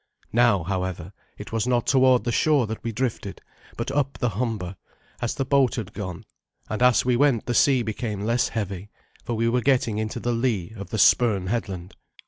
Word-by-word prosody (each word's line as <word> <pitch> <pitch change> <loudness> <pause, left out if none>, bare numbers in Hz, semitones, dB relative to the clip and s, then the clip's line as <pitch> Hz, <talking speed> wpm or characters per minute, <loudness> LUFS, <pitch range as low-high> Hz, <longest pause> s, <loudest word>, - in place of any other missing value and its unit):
Now, 115 -6 +4
however, 95 0 -4 0.2
it - - -9
was 115 +1 -1
not 120 -2 +1
toward 130 -3 +4
the 120 - -1
shore 145 0 +3
that 110 +1 -6
we 115 - -2
drifted, 115 -4 -3 0.4
but 115 +3 -3
up 140 -1 -1
the 120 - 0
Humber, 105 -4 -3 0.5
as 120 - -1
the 135 - -2
boat 135 -1 +3
had 105 -4 -5
gone; 90 -4 -6 0.4
and 110 - -4
as 125 -1 +4
we 125 -1 +2
went 130 -3 +2
the 120 - -1
sea 130 -1 +4
became 110 -1 -4
less 115 +3 +1
heavy, 100 -2 -4 0.3
for 120 - -3
we 115 +1 +1
were 125 +1 +1
getting 120 -5 +1
into 110 0 -3
the 120 - -1
lee 115 -5 -1
of 100 -2 -8
the 110 - -3
Spurn 105 -3 +4
headland. 95 -4 -4
115 Hz, 195 wpm, -24 LUFS, 100-125 Hz, 0.5 s, Now